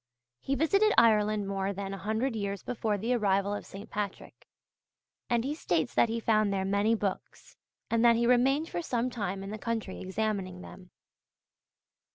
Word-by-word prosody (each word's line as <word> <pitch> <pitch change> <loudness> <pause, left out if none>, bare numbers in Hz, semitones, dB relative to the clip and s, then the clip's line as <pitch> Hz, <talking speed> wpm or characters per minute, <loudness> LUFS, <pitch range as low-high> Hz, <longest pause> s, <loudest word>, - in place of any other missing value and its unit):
He 275 - -1
visited 395 - +3
Ireland 215 -2 +4
more 195 0 -2
than 195 0 -5
a - - -5
hundred 220 +5 -1
years 200 -2 -3
before 220 -3 -1
the 230 +5 -1
arrival 200 -3 +1
of 205 - -5
St. 200 +2 -9
Patrick; 205 -2 -5 0.8
and 235 -1 +2
he 285 - -1
states 175 - -1
that 230 - +3
he 230 +1 -1
found 215 -2 +2
there 190 -1 -1
many 200 +3 +2
books, 200 -3 -5 0.3
and 230 0 +1
that 235 -1 +6
he 235 +1 +1
remained 265 +6 +3
for 345 - -3
some 250 -5 -1
time 195 -4 -3
in 195 - -6
the 215 - -6
country 225 -4 -3
examining 190 -2 -3
them. 180 0 -12
215 Hz, 175 wpm, -29 LUFS, 195-235 Hz, 0.8 s, that